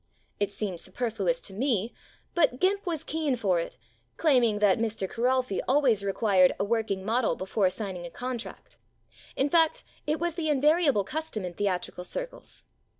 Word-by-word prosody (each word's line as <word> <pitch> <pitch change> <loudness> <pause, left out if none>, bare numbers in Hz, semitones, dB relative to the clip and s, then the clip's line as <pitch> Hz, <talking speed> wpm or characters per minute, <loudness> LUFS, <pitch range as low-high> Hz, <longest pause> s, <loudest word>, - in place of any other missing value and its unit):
It 205 -1 +1
seemed 200 -4 -3
superfluous 245 - -2
to 195 - -7
me, 230 -1 0 0.4
but 290 -7 +2
"Gimp" 395 +1 +1
was 325 -3 -2
keen 310 -4 -1
for 195 -7 +1
it, 165 - -5 0.4
claiming 250 -9 +3
that 205 -1 +3
Mr. 220 -4 -1
Kiralfy 250 -1 0
always 255 -7 +3
re 200 - 0
quired 190 -4 +4
a - - +2
working 205 -3 -1
model 225 -4 +1
before 190 0 +1
signing 185 -3 -5
a - - -9
contract; 245 +3 -7 0.6
in 270 - +2
fact, 325 +1 +3 0.2
it 305 +1 0
was 345 0 -1
the 315 -2 -2
invariable 295 - +3
cus 315 +10 -4
tom 210 -4 -4
in 180 - -5
theatrical 180 -1 -2
circles. - - -7
230 Hz, 165 wpm, -28 LUFS, 200-295 Hz, 0.6 s, quired